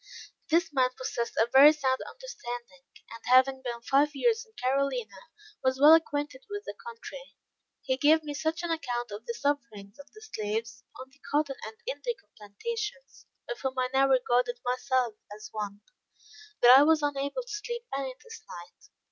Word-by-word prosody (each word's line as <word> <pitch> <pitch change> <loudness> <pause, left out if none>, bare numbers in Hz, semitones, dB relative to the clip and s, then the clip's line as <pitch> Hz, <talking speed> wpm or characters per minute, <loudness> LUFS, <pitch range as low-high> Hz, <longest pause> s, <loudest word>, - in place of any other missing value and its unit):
This 330 -1 +2
man 255 -2 +3
possessed 235 -2 -3
a 225 - +4
very 280 +3 +10
sound 265 -4 0
understanding; 240 - -8 0.3
and 230 - -9
having 260 +1 +5
been 240 -2 -5
five 285 +3 +2
years 455 - +2
in 445 -2 -25
Carolina, 255 - -2 0.3
was 260 0 +1
well 295 +3 +9
acquainted 315 +7 +1
with 410 0 -5
the - - -5
country. 470 +2 -10 0.5
He 260 -1 0
gave 310 +3 +4
me 295 -1 -5
such 320 +3 -2
an 340 - -2
account 245 -7 -3
of 210 +3 -8
the 235 - -3
sufferings 240 -6 -3
of 285 - -14
the 430 - -14
slaves, 225 - -4 0.2
on 260 +1 -10
the 280 - -25
cotton 290 -2 +1
and - - -7
indigo 480 -3 -4
plantations 275 - -6 0.2
of - - -5
whom 265 -1 -3
I 255 0 +1
now 270 +1 +4
regarded 250 -2 +2
myself 250 -1 0 0.2
as 215 0 -10
one 205 -1 -5 0.8
that 245 +1 +10
I 270 - +9
was 310 +1 +4
unable 285 - -1
to - - -25
sleep 475 +3 -5
any 270 -2 -3
this 455 -1 -11
night. 175 0 -12
270 Hz, 175 wpm, -28 LUFS, 245-320 Hz, 0.8 s, very